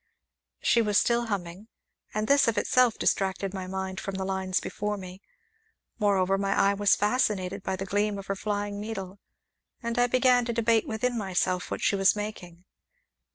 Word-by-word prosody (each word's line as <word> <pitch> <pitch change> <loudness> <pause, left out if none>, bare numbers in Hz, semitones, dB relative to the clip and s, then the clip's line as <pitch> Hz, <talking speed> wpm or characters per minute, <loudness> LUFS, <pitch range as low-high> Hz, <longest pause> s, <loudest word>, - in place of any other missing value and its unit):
She 235 - +4
was 210 -2 +1
still 235 0 +2
humming, 195 0 -5 0.4
and 215 +1 -2
this 280 -2 +4
of 230 - +1
itself 250 -3 +3
distracted 195 0 0
my 190 -1 -5
mind 190 0 -4
from 195 - -5
the 190 0 -3
lines 190 -1 -1
before 210 0 -3
me; 185 0 -10 0.8
moreover, 195 -2 +2
my 195 0 0
eye 200 - +4
was 200 0 +3
fascinated 205 -3 0
by 190 - -2
the 190 +1 -5
gleam 205 +1 0
of 195 - -7
her 195 - -2
flying 205 0 -3
needle, 195 -3 -6 0.6
and 235 +1 -2
I 245 - +4
began 250 0 +3
to 235 - -2
debate 230 -1 +2
within 240 +3 -1
myself 185 -2 -1
what - - -4
she - - +3
was 195 0 +4
making. 185 -4 -7
200 Hz, 175 wpm, -27 LUFS, 190-220 Hz, 0.8 s, She